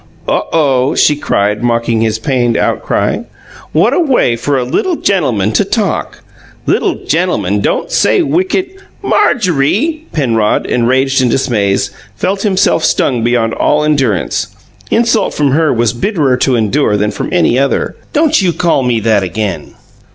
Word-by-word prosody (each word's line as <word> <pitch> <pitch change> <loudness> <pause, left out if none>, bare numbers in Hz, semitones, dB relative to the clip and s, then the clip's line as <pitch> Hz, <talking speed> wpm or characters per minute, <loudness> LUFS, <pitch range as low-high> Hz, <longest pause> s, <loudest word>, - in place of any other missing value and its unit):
"Oh, - - 0
OH!" 135 -5 +1
she 150 - +3
cried, 105 -7 -1
mocking 115 -1 0
his 110 -1 0
pained 120 -1 0
outcry. - - -1 0.5
"What - - +2
a - - +1
way 265 - +2
for 135 +4 -1
a 130 - 0
LITTLE 340 - -1
GENTLEMAN 125 - 0
to 205 - +2
talk! 200 +1 -2 0.4
Little - - -1
gentleman - - 0
don't - - -1
say 370 - +2
wicked 365 +4 -1 0.2
" - - -33
"Marjorie!" 240 - +1
Penrod, 115 -8 0
enraged 130 +3 +1
and 125 - +2
dismayed, 105 -6 0 0.3
felt 195 - -2
himself 190 -5 +1
stung 125 -7 +1
beyond 115 -1 +1
all 150 0 +1
endurance. 135 - 0 0.4
Insult 230 -1 +1
from 145 -2 +1
her 155 +2 +2
was 120 -1 +1
bitterer 145 - 0
to 130 0 +1
endure 110 0 +1
than 105 +1 0
from - - -5
any 125 - +2
other. 140 0 -1 0.2
"Don't 310 -3 +2
you 180 -3 +1
call 170 -5 +1
me 125 -3 0
that 110 -2 +2
again!" 100 +1 -4
135 Hz, 150 wpm, -13 LUFS, 115-190 Hz, 0.5 s, she